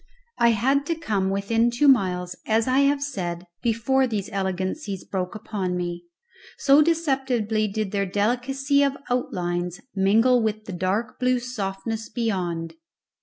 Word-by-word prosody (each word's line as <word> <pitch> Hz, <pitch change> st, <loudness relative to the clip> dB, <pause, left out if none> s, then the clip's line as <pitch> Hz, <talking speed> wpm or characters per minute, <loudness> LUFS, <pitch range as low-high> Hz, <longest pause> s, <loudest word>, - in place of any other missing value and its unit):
I 235 Hz, -, +5 dB
had 265 Hz, +6 st, +2 dB
to 335 Hz, -, 0 dB
come 210 Hz, -12 st, -1 dB
within 225 Hz, +4 st, +1 dB
two 245 Hz, +5 st, +2 dB
miles, 180 Hz, -8 st, +3 dB
as 220 Hz, +1 st, +2 dB
I 260 Hz, +1 st, +3 dB
have 280 Hz, 0 st, +3 dB
said, 180 Hz, -10 st, -4 dB, 0.2 s
before 240 Hz, +3 st, +2 dB
these 210 Hz, -5 st, -3 dB
elegancies 190 Hz, -, -3 dB
broke 185 Hz, -1 st, -4 dB
upon 195 Hz, -4 st, -3 dB
me, 175 Hz, 0 st, -4 dB, 0.5 s
so 280 Hz, +1 st, +5 dB
deceptively 265 Hz, -9 st, +1 dB
did 210 Hz, -1 st, -3 dB
their 200 Hz, -1 st, 0 dB
delicacy 255 Hz, +8 st, +1 dB
of 280 Hz, -1 st, +1 dB
outlines 175 Hz, -7 st, -2 dB
mingle 225 Hz, +6 st, +4 dB
with 215 Hz, -1 st, -2 dB
the 195 Hz, -, -6 dB
dark 190 Hz, +6 st, -2 dB
blue 255 Hz, 0 st, +2 dB
softness 225 Hz, -2 st, -4 dB
beyond. 180 Hz, -8 st, -2 dB
220 Hz, 140 wpm, -24 LUFS, 190-255 Hz, 0.5 s, I